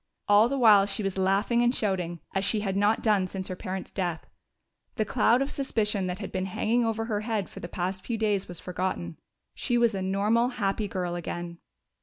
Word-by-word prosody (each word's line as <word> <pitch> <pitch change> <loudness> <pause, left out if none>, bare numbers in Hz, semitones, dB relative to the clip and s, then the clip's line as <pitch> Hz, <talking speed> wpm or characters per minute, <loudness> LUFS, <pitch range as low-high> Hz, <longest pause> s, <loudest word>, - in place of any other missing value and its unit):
All 205 +3 +6
the 275 - -1
while 210 -5 +6
she 205 +1 -1
was 195 -1 -2
laughing 195 +5 +2
and 240 +1 +3
shouting 180 -5 -1
as 195 - 0
she 210 +1 +1
had 195 -2 -2
not 205 +2 +2
done 205 -4 +3
since 190 +1 -6
her 185 - -3
parents' 185 +1 -5
death; 175 -4 -3 0.7
the 215 - 0
cloud 240 +3 +3
of 275 - -5
suspicion 210 -8 -1
that 180 0 -3
had 200 - -6
been 185 0 -2
hanging 225 +5 +1
over 225 0 -1
her 215 -3 -1
head 215 -3 -2
for - - -10
the 175 - -6
past 185 +2 -3
few 235 - -2
days 210 -3 0
was 175 -1 -5
forgotten. 180 - -3 0.3
She 240 - 0
was 235 -2 +3
a 195 - -3
normal, 205 +5 +2
happy 205 0 0
girl 180 -3 -3
again. 175 0 -5
200 Hz, 210 wpm, -27 LUFS, 185-225 Hz, 0.7 s, All